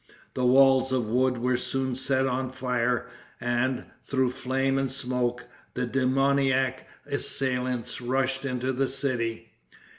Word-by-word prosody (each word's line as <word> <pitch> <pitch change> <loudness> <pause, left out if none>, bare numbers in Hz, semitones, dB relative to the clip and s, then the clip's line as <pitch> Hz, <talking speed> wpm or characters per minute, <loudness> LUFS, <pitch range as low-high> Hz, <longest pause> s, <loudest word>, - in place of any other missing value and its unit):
The 125 -1 +1
walls 130 0 +5
of 130 -3 +1
wood 125 +3 +1
were 125 +1 +1
soon 130 +1 -2
set 130 +1 +1
on 130 0 -1
fire, 125 -1 0 0.3
and, 120 +1 0 0.2
through 130 -2 +1
flame 135 +1 0
and 135 -2 -1
smoke, 125 -2 -2 0.3
the 125 - 0
demoniac 135 +1 +1 0.2
assailants 125 -3 -1
rushed 130 +2 0
into 130 -1 -1
the 135 +1 0
city. 115 -5 -2
130 Hz, 125 wpm, -27 LUFS, 125-135 Hz, 0.3 s, walls